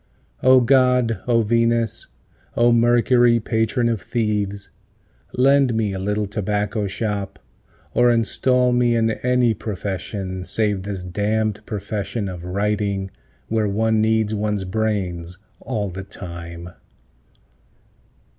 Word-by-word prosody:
O 130 0 +6
God, 125 -2 +3
O 115 -2 +3
Venus, 115 0 +1 0.5
O 120 0 +5
Mercury, 120 0 +4
patron 115 +2 0
of 115 -3 -1
thieves, 105 -4 -2 0.6
Lend 135 -1 +3
me 110 -3 0
a 95 - -4
little 105 +2 -1
tobacco 105 +1 -2
shop, 100 -1 -3 0.6
or 120 0 +4
install 125 +2 +2
me 120 -1 +2
in 115 -1 +2
any 125 0 +1
profession 95 -2 -5
Save 105 0 0
this 95 -1 -5
damn'd 105 +3 -1
profession 105 0 -3
of 90 -2 -7
writing, 100 0 -1 0.4
where 110 -1 0
one 110 +2 +1
needs 110 -1 +1
one's 105 -1 -1
brains 95 -4 -2 0.2
all 105 -7 -3
the 95 +2 -6
time. 85 -2 -8
105 Hz, 115 wpm, -21 LUFS, 100-115 Hz, 0.6 s, O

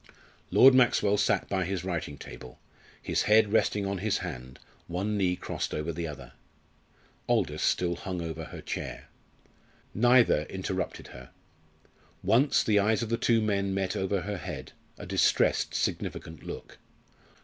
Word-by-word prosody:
Lord 135 0 +7
Maxwell 120 -5 +4
sat - - +1
by 95 -1 0
his 95 +1 -3
writing 85 -6 -4
table, 65 -1 -11 0.4
his - - -1
head 105 -1 +5
resting 105 -2 +2
on 100 -1 -2
his 105 +2 0
hand, 65 +1 -7 0.3
one 95 +5 -2
knee 95 -3 +1
crossed - - -4
over 75 +2 -3
the 85 +1 -4
other. 70 -5 -9 1.0
Aldous - - +1
still 85 -1 +1
hung 95 -5 -5
over 80 -1 -5
her - - -9
chair. - - -6 0.8
Neither 120 -7 +4
interrupted 95 0 -4
her. 60 0 -12 0.9
Once 130 +6 +3
the 105 -2 +3
eyes 110 +3 +2
of 115 - -4
the 115 - +2
two 115 -1 +2
men 100 -2 0
met 95 -1 -1
over 95 0 -1
her 105 +1 -4
head - - -7 0.3
a - - -8
distressed, - - +2
significant 80 -2 -3
look. - - -9
95 Hz, 150 wpm, -28 LUFS, 85-105 Hz, 1.0 s, Lord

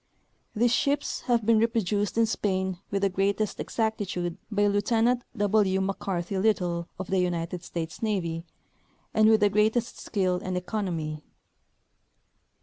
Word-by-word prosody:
These 235 +2 +3
ships 285 +2 0
have 235 -3 +3
been 225 0 +5
reproduced 215 -3 0
in 230 - +5
Spain 190 -4 -1
Avith 200 -1 0
the 200 - +3
greatest 200 +2 0
exactitude 195 -6 -2
by 205 -2 +2
Lieutenant 225 +4 +2 0.2
W. 205 -2 +2
McCarty 190 -1 -2
Little, 175 -5 +1
of 190 - -6
the 190 - +3
United 175 -1 -1
States 165 -2 -5
Navy, 175 -7 -1 0.7
and 215 0 +5
with 220 -1 +5
the 205 - +5
greatest 220 +3 +1
skill 185 -4 0
and 185 0 -2
economy. 175 -6 -3
200 Hz, 135 wpm, -27 LUFS, 180-220 Hz, 0.7 s, been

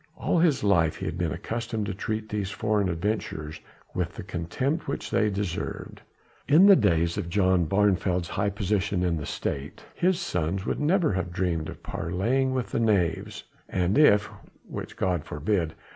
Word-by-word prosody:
All 175 - +1
his 160 -8 +3
life 85 -6 +3
he - - -6
had - - -3
been - - 0
accustomed 115 -2 -3
to 100 - -3
treat 110 +2 -3
these 105 -2 -2
foreign 100 0 0
adventurers 85 -4 -3 0.3
with 90 -2 -2
the 110 - -6
contempt 100 - -2
which 140 - -4
they 105 - +2
deserved. 100 -3 -4 0.5
In 155 +7 +7
the 200 -1 +9
days 85 - +2
of 85 - -4
John 95 -1 +3
of 80 - -1
Barneveld's 95 -3 +2
high 100 0 0
position 100 -2 -1
in 85 -2 +1
the 75 - -5
State, 70 +2 -4
his 180 0 +1
sons 95 - -2
would - - -1
never 165 - +2
have 90 -1 -2
dreamed 85 -3 -1
of - - -10
parleying 115 +10 0
with 130 -2 -2
the - - 0
knaves, 100 -7 0 0.3
and 90 0 +1
if 105 -9 +5 0.4
which - - -7
God 90 -5 0
forbid! 80 +1 -1
100 Hz, 175 wpm, -26 LUFS, 85-110 Hz, 0.5 s, the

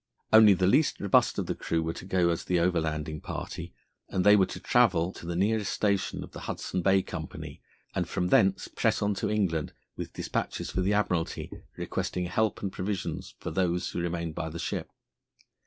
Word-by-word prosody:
Only 110 -2 +9
the 90 0 +1
least 145 +11 +3
robust 100 - +3
of - - -1
the - - -1
crew 80 0 -1
were 80 0 -2
to - - -9
go 90 -2 +2
as 85 - -2
the 90 - +1
overlanding 80 -3 0
party, - - -6 0.4
and 90 - 0
they 105 0 +8
were 95 -2 +4
to 90 - -7
travel 95 -7 +3
to 85 - -10
the 85 - -2
nearest 105 +2 +1
station 100 -2 0
of - - -11
the - - -8
Hudson 90 - -2
Bay 95 +1 +4
Company, - - -7 0.3
and - - -1
from 90 0 -1
thence 95 +1 +3
press - - 0
on 100 0 +2
to 100 - -2
England 95 -8 0 0.2
with - - -6
despatches - - -3
for 95 - 0
the 95 +3 +2
Admiralty 90 -5 -1 0.3
requesting 90 -1 -2
help 105 +5 0
and 95 - -1
provisions 95 +1 -4
for - - -5
those 90 -1 0
who 85 - -2
remained 85 -1 -2
by 80 - -3
the 80 - -7
ship. 85 - -3
90 Hz, 195 wpm, -28 LUFS, 85-100 Hz, 0.4 s, Only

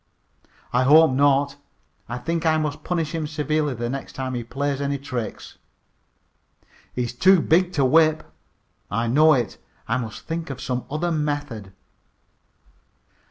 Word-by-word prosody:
"I 125 - +3
hope 155 +3 +6
not. 140 +1 +2 0.5
I 120 - -3
think 165 +6 -2
I 160 -1 +3
must 150 -2 -3
punish 165 -3 -2
him 160 -2 -2
severely 150 -2 -1
the 120 +1 -3
next 135 +3 -5
time 130 -1 -4
he 120 -1 -3
plays 140 +3 -2
any 140 0 -1
tricks." 125 -5 -6 1.4
"He 125 - 0
is 120 - -4
too 185 +8 +5
big 175 +3 +2
to 140 -3 +2
whip." 155 +3 +4 0.7
"I 115 +3 -1
know 155 +7 +5
it. 120 -5 -1 0.3
I 115 - +1
must 115 -4 -6
think 165 -1 -4
of 135 -2 -6
some 125 -1 -3
other 160 +4 -1
method." 145 - -3
140 Hz, 150 wpm, -23 LUFS, 125-155 Hz, 1.4 s, hope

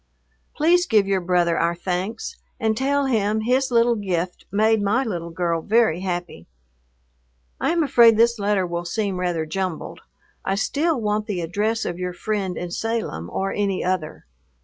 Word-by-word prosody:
Please 355 +4 +3
give 215 -4 +4
your 195 -1 0
brother 175 -1 +1
our 170 +1 +1
thanks, 185 +5 -3 0.2
and 220 -2 +1
tell 280 +3 +1
him 220 -4 +1
his 255 +4 +1
little 235 0 +4
gift 180 -4 -3
made 215 +2 +3
my 210 +6 +2
little 175 -8 -4
girl 170 -1 -1
very 215 -4 +2
happy. 175 - -4 1.1
I - - 0
am 335 -1 +2
afraid 235 -6 +6
this 235 0 +3
letter 200 -2 +1
will 170 0 -3
seem 195 0 -2
rather 175 -3 -1
jumbled. 185 +1 -4 0.4
I 195 - 0
still 290 +8 0
want 210 -1 -1
the 185 -4 -2
address 210 +7 -1
of 175 0 -4
your 180 0 -3
friend 195 -1 -2
in 175 -1 -5
Salem 220 - -3
or 195 0 -2
any 200 -2 -1
other. 180 -4 -2
200 Hz, 165 wpm, -23 LUFS, 175-225 Hz, 1.1 s, afraid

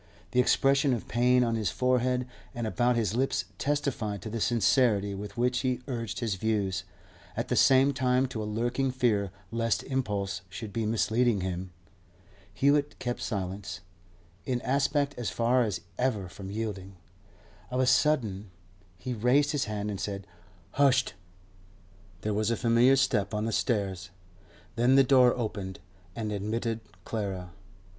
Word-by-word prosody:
The 125 - +2
expression 135 +2 +3
of 115 - -7
pain 125 +2 +3
on 115 -1 0
his 110 -4 0
forehead 125 +1 +1 0.3
and 120 -1 -3
about 120 +2 +1
his 110 -3 0
lips 130 -7 0
testified 125 -9 -1
to 110 - -6
the 115 0 -3
sincerity 115 -3 +2
with 100 +4 -7
which 125 +1 +1
he 125 -2 -1
urged 115 -5 -4
his 115 -4 0
views, 100 -3 -1 0.5
at 115 - -2
the 125 - +1
same 135 +3 +5
time 130 -1 +2
to 110 -4 -4
a - - -3
lurking 120 +5 -1
fear 115 -6 +1 0.2
lest 115 -4 0
impulse 105 -8 -2
should 100 +2 -7
be 115 -2 -1
misleading 115 0 +2
him. 90 0 -3 0.8
Hewett 145 +1 +2
kept 120 -1 -3
silence, 95 -3 -4 0.6
in 125 -2 -1
aspect 140 +2 +1
as 120 - -1
far 120 +2 +2
as 100 -7 -1 0.2
ever 110 -7 0
from 95 +2 -9
yielding. 100 -3 -5 0.7
Of 125 - -2
a 130 - +3
sudden 110 -9 +2 0.5
he 125 +8 -4
raised 125 +6 +3
his 145 -3 0
hand, 105 0 -3
and 100 - -5
said, 100 -1 -4 0.5
'Husht!' 135 -2 +4 1.1
There 105 - -1
was 110 +1 0
a 115 - 0
familiar 120 +3 +4
step 125 -6 +1
on 105 +1 -1
the 115 - -1
stairs. 95 -7 -1 0.7
Then 125 +3 +4
the 135 - +7
door 125 -2 +5
opened 100 -5 -4 0.4
and 110 -2 -3
admitted 110 +3 -2 0.3
Clara. 95 -5 -4
115 Hz, 150 wpm, -28 LUFS, 105-125 Hz, 1.1 s, the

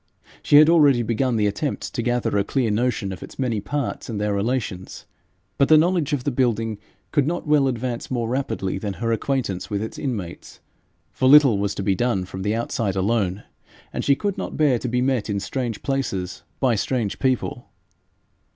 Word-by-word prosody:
She - - +3
had 150 +1 +9
already 145 -7 +5
begun 120 +2 0
the 105 -2 +2
attempt 105 +8 -2
to 120 - -1
gather 120 -2 0
a 100 - +3
clear 120 +1 0
notion 110 -2 0
of 90 - -8
its - - -10
many 120 -6 -1
parts 145 +4 -3
and 110 -3 -3
their 105 0 0
relations, 100 -3 -3 0.5
but 140 - +4
the 155 - +8
knowledge 165 -2 +2
of 140 -4 -1
the 145 - 0
building 115 -4 0 0.3
could 145 -2 +2
not 175 +2 -2
well 150 -2 +3
advance 120 -1 -3
more 120 -3 -1
rapidly 115 -6 -2
than 105 -2 -3
her 115 +3 -2
acquaintance 115 -5 -2
with 105 0 -2
its 110 - -6
inmates, 105 - -5 0.5
for 130 - +2
little 135 -7 +7
was 100 0 -1
to 100 - -3
be 100 - +2
done 100 -2 0
from 95 +1 -7
the 105 +3 0
outside 115 -3 -2
alone, 100 -1 0 0.5
and - - -2
she 140 - +4
could 200 +5 -3
not - - -5
bear 140 -6 +3
to 125 - -4
be 125 +1 0
met 130 -5 0
in 100 -1 0
strange 120 +1 -4
places 100 -10 -2 0.2
by 130 -3 +3
strange 115 -1 -1
people. 130 -2 -1
120 Hz, 195 wpm, -23 LUFS, 105-135 Hz, 0.5 s, had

